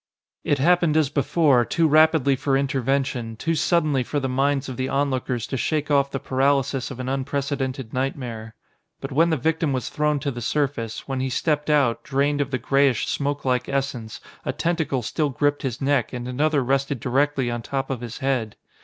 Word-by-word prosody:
It 145 Hz, -, +1 dB
happened 170 Hz, +1 st, +3 dB
as 155 Hz, -4 st, +3 dB
before, 140 Hz, -2 st, +3 dB
too 165 Hz, +6 st, +1 dB
rapidly 155 Hz, -2 st, +4 dB
for 135 Hz, +1 st, +1 dB
intervention, 135 Hz, -3 st, -1 dB
too 165 Hz, +9 st, -1 dB
suddenly 155 Hz, -3 st, +2 dB
for 145 Hz, +4 st, -2 dB
the 135 Hz, -, -2 dB
minds 135 Hz, +2 st, 0 dB
of 130 Hz, -, -5 dB
the 130 Hz, +1 st, -2 dB
onlookers 130 Hz, -4 st, -1 dB
to 135 Hz, -, -3 dB
shake 150 Hz, +3 st, -1 dB
off 140 Hz, -1 st, +3 dB
the 135 Hz, -, -3 dB
paralysis 135 Hz, 0 st, +1 dB
of 130 Hz, -3 st, -8 dB
an 130 Hz, -, -4 dB
unprecedented 135 Hz, -2 st, -2 dB
nightmare. 120 Hz, -4 st, -4 dB, 0.4 s
But 135 Hz, -, -6 dB
when 165 Hz, +5 st, +3 dB
the 160 Hz, -, +1 dB
victim 160 Hz, +1 st, 0 dB
was 130 Hz, -, -2 dB
thrown 150 Hz, -1 st, 0 dB
to 140 Hz, 0 st, -1 dB
the 120 Hz, -1 st, -6 dB
surface, 120 Hz, -4 st, -2 dB
when 135 Hz, -1 st, -2 dB
he 130 Hz, 0 st, -1 dB
stepped 150 Hz, +3 st, 0 dB
out, 120 Hz, -6 st, +2 dB
drained 145 Hz, +1 st, +1 dB
of 140 Hz, -, -1 dB
the 130 Hz, -, -1 dB
grayish 135 Hz, -1 st, +2 dB
smokelike 135 Hz, -3 st, -1 dB
essence, 135 Hz, -5 st, -3 dB, 0.2 s
a -, -, -1 dB
tentacle 160 Hz, -7 st, -1 dB
still 150 Hz, +6 st, -1 dB
gripped 145 Hz, +2 st, 0 dB
his 130 Hz, -2 st, -3 dB
neck 135 Hz, -3 st, +1 dB
and 125 Hz, 0 st, -5 dB
another 145 Hz, +2 st, +1 dB
rested 135 Hz, +1 st, 0 dB
directly 135 Hz, 0 st, +1 dB
on 120 Hz, 0 st, -3 dB
top 135 Hz, +3 st, -3 dB
of 125 Hz, -3 st, -3 dB
his 115 Hz, -2 st, -6 dB
head. 130 Hz, -6 st, -1 dB
135 Hz, 190 wpm, -23 LUFS, 130-145 Hz, 0.4 s, rapidly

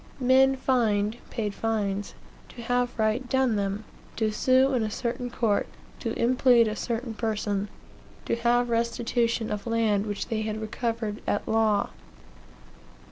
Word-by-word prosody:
Men 265 Hz, +1 st, +5 dB
fined 225 Hz, -5 st, +1 dB
(paid 210 Hz, -3 st, -3 dB
fines) 205 Hz, -2 st, -2 dB, 0.3 s
to 235 Hz, -, -10 dB
have 245 Hz, 0 st, 0 dB
right 220 Hz, +3 st, 0 dB
done 265 Hz, -4 st, +2 dB
them; 200 Hz, +1 st, -2 dB, 0.3 s
to 220 Hz, -1 st, 0 dB
sue 260 Hz, +5 st, +3 dB
in 250 Hz, -, +2 dB
a 215 Hz, -, -1 dB
certain 245 Hz, +2 st, -3 dB
court; 225 Hz, -3 st, 0 dB, 0.3 s
to -, -, -3 dB
implead 245 Hz, -1 st, +4 dB
a 215 Hz, -, -2 dB
certain 235 Hz, +1 st, -3 dB
person; 210 Hz, -2 st, -2 dB, 0.6 s
to -, -, 0 dB
have 240 Hz, +1 st, +2 dB
restitution 235 Hz, 0 st, 0 dB
of 210 Hz, 0 st, -4 dB
land 220 Hz, -3 st, +1 dB
which 205 Hz, -1 st, -4 dB
they 220 Hz, -1 st, -1 dB
had 215 Hz, 0 st, -3 dB
recovered 225 Hz, -1 st, -3 dB
at 205 Hz, -, -1 dB
law. 220 Hz, -2 st, +2 dB
230 Hz, 140 wpm, -27 LUFS, 215-245 Hz, 0.6 s, Men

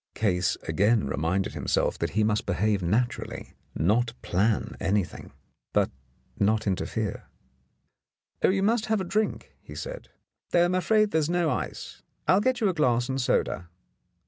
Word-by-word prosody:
Case 90 Hz, -4 st, +1 dB
again 100 Hz, +6 st, +2 dB
reminded 80 Hz, +7 st, -1 dB
himself -, -, 0 dB
that -, -, 0 dB
he 110 Hz, -, +4 dB
must 105 Hz, 0 st, 0 dB
behave 105 Hz, -2 st, +1 dB
naturally 115 Hz, +8 st, -2 dB
— -, -, -39 dB
not 115 Hz, +8 st, +1 dB
plan 105 Hz, +4 st, 0 dB
anything, 95 Hz, -2 st, -1 dB, 0.4 s
but -, -, +2 dB, 0.5 s
not 110 Hz, +2 st, +2 dB
interfere. 95 Hz, -3 st, -2 dB, 1.1 s
"Oh, -, -, +4 dB
you 195 Hz, +1 st, +1 dB
must 220 Hz, +2 st, +2 dB
have 220 Hz, -1 st, +1 dB
a -, -, -1 dB
drink," 210 Hz, +4 st, -2 dB
he -, -, -11 dB
said, -, -, -7 dB, 0.4 s
"though 175 Hz, 0 st, +4 dB
I'm 175 Hz, -, 0 dB
afraid 210 Hz, +4 st, +3 dB
there 160 Hz, -, +3 dB
is 155 Hz, 0 st, 0 dB
no 175 Hz, -3 st, +1 dB
ice. -, -, -5 dB, 0.3 s
I'll 190 Hz, -, +5 dB
get 255 Hz, +1 st, +1 dB
you 215 Hz, -, +3 dB
a 190 Hz, -, +1 dB
glass 125 Hz, -5 st, +1 dB
and 135 Hz, 0 st, -1 dB
soda." 85 Hz, -7 st, 0 dB
120 Hz, 160 wpm, -27 LUFS, -, 1.1 s, I'll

